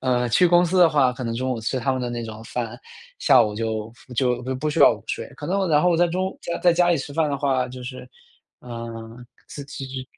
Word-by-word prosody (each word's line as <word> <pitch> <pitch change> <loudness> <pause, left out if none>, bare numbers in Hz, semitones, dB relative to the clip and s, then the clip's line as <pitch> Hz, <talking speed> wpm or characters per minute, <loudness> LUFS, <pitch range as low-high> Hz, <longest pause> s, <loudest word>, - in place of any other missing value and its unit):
呃， 125 -2 +1
去 180 +10 +4
公 175 +1 +5
司 180 +2 0
的 175 - +7
话， 135 -5 +3
可 125 0 -7
能 115 0 -2
中 130 +2 -2
午 120 -3 -2
吃 120 +4 -2
他 130 +3 0
们 130 - -2
的 125 - -2
那 120 -1 -4
种 110 0 -8
饭， 120 0 -5 0.4
下 - - +5
午 105 -1 -2
就 110 0 -3 0.2
就 125 -1 +1 0.2
不 155 +1 0
需 - - -3
要 - - +8
午 - - -9
睡， - - -3
可 - - -7
能 195 - +1
我 195 - +1
然 150 -2 +3
后 180 -1 +3
在 175 +1 +4
中 185 +2 -1
午 - - -16 0.2
在 175 - +5
家 175 +1 +3
里 170 - +3
吃 140 0 -6
饭 160 0 +1
的 140 - -1
话， 135 -2 0
就 125 0 -9
是， 130 0 -8 0.5
呃， 115 -1 -7 0.6
其 140 -1 -8
实 130 0 -6
130 Hz, 270 characters per minute, -23 LUFS, 120-165 Hz, 0.6 s, 要